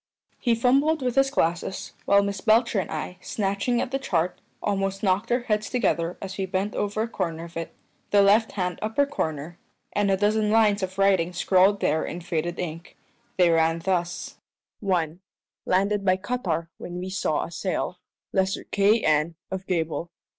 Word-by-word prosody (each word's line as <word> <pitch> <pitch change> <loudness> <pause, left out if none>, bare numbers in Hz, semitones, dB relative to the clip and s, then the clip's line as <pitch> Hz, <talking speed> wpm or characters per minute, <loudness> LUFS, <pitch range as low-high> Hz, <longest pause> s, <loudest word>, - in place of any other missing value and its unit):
He 235 -2 +2
fumbled 275 +6 +3
with 250 -1 0
his 270 +1 +3
glasses, 175 -6 -1
while 200 0 +5
Miss 200 -1 -3
Belcher 225 -1 +3
and 180 - -3
I, 160 +3 -5
snatching 200 +4 -1
at 255 - -2
the 270 - 0
chart, 180 -9 -1 0.2
almost 195 -1 -1
knocked 200 +4 +1
our 245 +1 +2
heads 215 -3 -1
together 180 -8 0
as 195 0 -7
we 190 - -1
bent 195 +2 -1
over 205 +1 -1
a - - -2
corner 165 -7 -3
of 170 0 -11
it 165 0 -5 0.3
the 205 -1 +5
left 210 +3 +4
hand 180 -3 -2
upper 220 +7 +1
corner 160 - -4 0.3
and 205 -1 +1
a 195 - +3
dozen 210 +1 +2
lines 215 -2 +4
of 190 0 -4
writing 190 -3 +3
scrawled 190 +2 +3
there 160 - +2
in 175 - -5
faded 170 0 -2
ink. 170 -1 -6 0.4
They 180 -2 +5
ran 165 0 +3
thus 175 0 -2 0.4
1. 175 -5 -1 0.5
Landed 200 +2 +2
by 185 -1 +3
cuttar 185 -6 -2
when 175 0 -6
wee 185 +1 -5
saw 155 -5 0
a 170 - -7
sail. 180 0 -3 0.3
Lesser 190 -1 +1
Kay 205 +3 +2
N. 155 +2 +2 0.2
of 190 0 -5
Gable. 165 -1 -1
190 Hz, 175 wpm, -25 LUFS, 175-210 Hz, 0.5 s, while